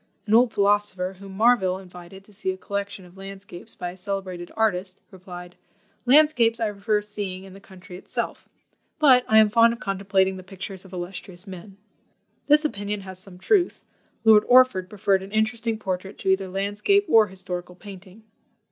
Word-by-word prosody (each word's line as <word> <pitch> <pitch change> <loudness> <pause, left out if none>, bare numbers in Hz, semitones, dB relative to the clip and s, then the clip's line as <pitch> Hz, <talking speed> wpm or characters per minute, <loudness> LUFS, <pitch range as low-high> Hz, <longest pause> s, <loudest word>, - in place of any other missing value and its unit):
An 215 - -1
old 240 +1 +5
philosopher, 200 -2 0
whom 195 -1 -10
Marville 215 -5 +3
invited 180 0 -12
to 210 - -21
see 195 -1 -4
a 185 - -2
collection 200 -1 -5
of 180 +2 -18
landscapes 195 +1 -10
by 175 0 -5
a - - -13
celebrated 185 -2 -5
artist, 195 -4 0
replied, 180 -2 -11 0.5
"Landscapes 250 -5 +4
I 220 -2 0
prefer 210 +1 -1
seeing 205 -3 -6
in 195 -1 -13
the 195 - -12
country 185 -1 -13
itself, - - -5 0.5
but 265 -5 +5
I 220 - +4
am 215 -1 +6
fond 230 +1 +5
of 235 - -9
contemplating 190 -1 0
the - - -8
pictures 190 0 -8
of 190 - -15
illustrious 180 0 -7
men." 190 0 -11 0.7
This 300 +1 +4
opinion 205 -6 -3
has 190 -1 -8
some 185 -1 -10
truth; 355 - +1 0.4
Lord 220 -2 +6
Orford 250 -8 +5
preferred 195 -2 +1
an 195 +1 -10
interesting 220 +1 0
portrait 190 -2 -5
to - - -3
either 190 0 +2
landscape 205 - +1
or 220 -7 +5
historical 180 -1 -7
painting. 195 +2 -13
195 Hz, 170 wpm, -24 LUFS, 185-220 Hz, 0.7 s, am